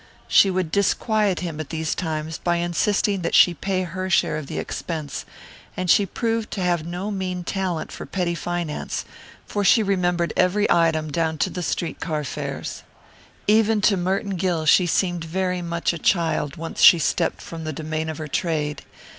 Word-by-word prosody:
She 195 - +6
would 185 -3 -1
disquiet 200 0 +1
him 165 -4 -4
at 155 - -5
these 160 -1 -2
times 160 -2 -3
by 175 -1 +1
insisting 185 +3 +1
that 170 - 0
she 180 - +7
pay 185 +3 -1
her 185 +2 -4
share 175 - +2
of 155 -2 -5
the - - -5
expense, 155 -4 -4 0.5
and 185 -2 +2
she 200 - +4
proved 225 +3 -2
to 195 - -3
have 175 -3 +1
no 180 +5 -4
mean 185 -2 -3
talent 185 -3 -2
for - - -8
petty 180 -3 -1
finance, 175 -2 -3 0.4
for 205 - -2
she 215 +3 +5
remembered 175 -4 0
every 185 +3 +3
item 160 -2 +2
down 160 +1 0
to 185 - 0
the 180 - -4
street 165 +1 -2
car 155 -3 -2
fares. 140 - -5 0.6
Even 220 +1 +4
to 200 +1 +4
Merton 190 +1 -1
Gill 175 -3 0
she 175 +4 +5
seemed 175 0 0
very 180 +2 -1
much 170 0 -1
a 170 - -6
child 165 -5 +1
once 165 +1 -5
she 175 - +9
stepped 160 - 0
from 165 -1 -8
the 155 - -3
domain 155 +1 -3
of 155 - -5
her 155 - -5
trade. 150 -2 -1
175 Hz, 180 wpm, -23 LUFS, 160-190 Hz, 0.6 s, she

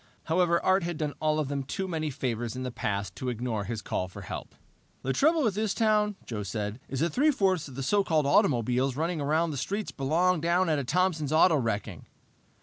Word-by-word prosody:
However 170 +1 +2
Art 190 +1 +4
had 170 -1 -3
done 150 -2 -2
all 155 0 +2
of 155 -3 0
them 140 0 -2
too 190 +8 -4
many 160 -3 -2
favors 120 -3 -3
in 130 - -4
the 125 - -3
past 100 -4 -3
to 130 - -3
ignore 115 -3 -2
his 110 -1 -4
call 95 - -2
for 95 +2 -10
help. - - -7 0.5
"The 135 - 0
trouble 315 - +3
with 220 -5 +2
this 215 0 -1
town," 210 -2 +2
Joe 110 -3 -4
said, 105 +3 -4
"is 135 0 -3
that 170 0 +1
three 300 +4 +4
fourths 190 - +1
of 135 - -11
the 135 - -4
so 200 +8 +2
called 155 -5 +1
automobiles 125 -1 +2
running 160 +1 -1
around 155 +3 +1
the 145 - -4
streets 200 +10 -3
belong 165 +5 +1
down 170 +2 +2
at 145 -5 0
Thompson's 165 -2 +1
Auto 160 +2 +5
Wrecking." 110 - -2
150 Hz, 215 wpm, -28 LUFS, 125-180 Hz, 0.5 s, Auto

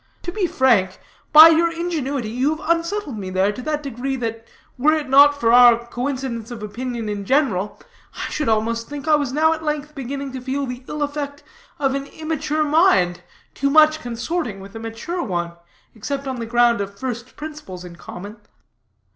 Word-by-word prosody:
To 350 - -4
be 375 -1 0
frank, 230 - +2 0.3
by 315 +1 +11
your 330 +1 +3
ingenuity 290 -9 -3
you 265 +6 0
have 310 - -10
unsettled 335 - -4
me 190 -2 -5
there, 190 +2 +1
to 230 - -8
that 300 +2 -2
degree 270 0 -3
that 230 -2 -5 0.3
were 295 +5 +3
it 310 -2 -1
not 285 +2 +6
for 230 -2 +3
our 240 -1 +7
coincidence 250 -2 -4
of 235 -3 -7
opinion 235 +1 -5
in 205 -1 -3
general, 210 -6 0 0.4
I - - -3
should 300 -5 -1
almost 230 +1 0
think 290 +1 -7
I 310 - +4
was 290 -4 +2
now 315 +3 +3
at 320 0 -7
length 300 -1 -3
beginning 275 0 -5
to 260 -1 -6
feel 275 +2 -2
the 250 0 -7
ill 300 -1 -3
effect 285 0 -4 0.3
of 270 -4 0
an 275 0 -3
immature 310 0 -2
mind, 290 - +3 0.3
too 280 - 0
much 310 +1 +5
consorting 240 - -3
with 195 +2 -12
a - - -5
mature 225 +11 -5
one, 175 - -2 0.4
except 275 +5 -5
on 260 -1 -3
the 230 -1 -5
ground 235 -1 +3
of 200 0 -6
first 245 0 -5
principles 295 - -8
in 175 -1 -10
common." 200 +5 -9
265 Hz, 190 wpm, -21 LUFS, 225-300 Hz, 0.4 s, by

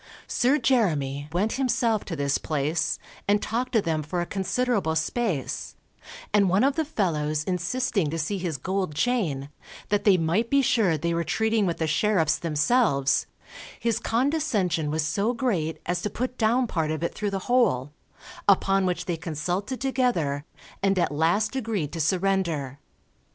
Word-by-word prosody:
Sir 260 +4 +2
Jeremy 155 - +1
went 195 +6 0
himself 235 -4 +1
to 170 - -4
this 140 -1 0
place, 155 +1 -1 0.3
and 205 +1 +4
talked 245 +5 -2
to 220 -4 +3
them 160 -2 0
for 165 +4 -3
a 175 - 0
considerable 200 -2 0
space, 160 - -2 0.6
and 200 -3 +4
one 190 +5 +3
of 275 +1 +3
the 320 - +1
fellows 155 - -1
insisting 180 - -1
to 165 - -3
see 175 +5 -2
his 170 -5 -2
gold 185 +1 -2
chain, 155 - 0 0.4
that 205 0 +1
they 195 -3 +5
might 180 +8 0
be 280 -1 +3
sure 200 -10 +2
they 170 +3 -1
were 170 0 0
treating 220 +2 +1
with 170 - -1
the 160 - 0
sheriffs 160 0 +2
themselves, 155 - +2 0.5
his 230 -2 0
condescension 225 - 0
was 155 +1 0
so 205 +10 0
great 185 -11 -1
as 175 0 -1
to 210 - -2
put 250 +4 -3
down 240 +2 +2
part 160 -8 -1
of 155 +1 -2
it 170 - -1
through 210 -1 -2
the 195 - -2
hole, 145 - +2 0.6
upon 195 -1 +4
which 180 - -2
they 175 -2 -2
consulted 175 - -3
together, 240 - 0 0.4
and 195 -1 +2
at 175 - +1
last 175 - +1
agreed 215 - -2
to 165 - -4
surrender. 170 -6 0
185 Hz, 165 wpm, -26 LUFS, 155-225 Hz, 0.6 s, they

